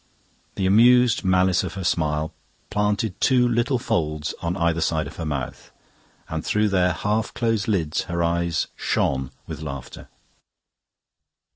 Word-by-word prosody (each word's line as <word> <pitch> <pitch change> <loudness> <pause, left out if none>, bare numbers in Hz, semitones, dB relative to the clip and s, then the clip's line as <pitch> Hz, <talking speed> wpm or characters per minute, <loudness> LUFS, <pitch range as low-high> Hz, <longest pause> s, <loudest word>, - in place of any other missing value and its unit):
The 95 - -1
amused 120 +4 +5
malice 95 -1 +3
of 95 0 -5
her 95 - -4
smile 80 -2 0 0.4
planted 105 -1 -1
two 125 -2 +4
little 120 +2 +1
folds 75 - -1
on 85 +2 -2
either 85 -1 +1
side 80 -1 0
of - - -10
her 80 - -4
mouth, 65 -4 -5 0.6
and 80 -1 -4
through 105 0 +1
their 90 -2 +2
half 105 +6 -1
closed 115 -4 0
lids 85 -8 0
her 85 0 -1
eyes 85 0 0
shone 65 -1 0 0.2
with 80 -2 -7
laughter. 70 -4 -7
90 Hz, 140 wpm, -23 LUFS, 80-105 Hz, 0.6 s, amused